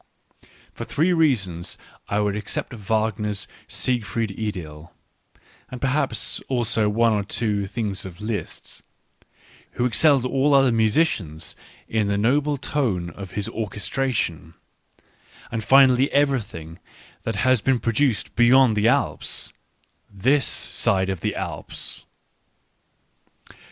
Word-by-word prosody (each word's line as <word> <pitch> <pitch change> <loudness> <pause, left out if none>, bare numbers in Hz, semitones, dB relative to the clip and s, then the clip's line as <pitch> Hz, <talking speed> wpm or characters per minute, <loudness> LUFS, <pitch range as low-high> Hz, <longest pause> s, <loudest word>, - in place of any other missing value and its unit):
For - - -6
three 165 +6 +1
reasons 100 - 0 0.3
I 100 +1 +1
would 105 -1 0
except 105 +4 -4 0.2
Wag 110 0 +1
ner's 105 -1 -2 0.2
Siegfried 115 -3 -1
Idyll, 90 -7 -6 0.8
and 125 - -7
perhaps 135 +3 0
also 115 -4 +1
one 115 +2 +3
or 105 -1 0
two 100 -1 -1
things 100 -2 -3
of 90 -2 -9
Liszt, 105 0 -5 0.9
who 120 - 0
excelled 130 +2 +3
all 135 +2 +2
other 135 -2 +5
musicians 110 - 0 0.3
in 110 -2 0
the 100 0 0
noble 140 +7 +2
tone 110 -12 -1
of 95 +1 -9
his 105 - -1
orchestration; 105 - -3 1.0
and 115 -1 -3
finally 135 0 +5
everything 110 - -1 0.4
that 115 - -3
has 130 +2 +2
been 135 +2 +2
produced 115 0 0
beyond 120 0 +5
the 105 +1 +2
Alps 140 +4 -1 0.3
— - - -40
this 140 +1 +4
side 95 0 0
of 95 - -4
the - - -2
Alps. - - -4
110 Hz, 120 wpm, -23 LUFS, 100-130 Hz, 1.0 s, other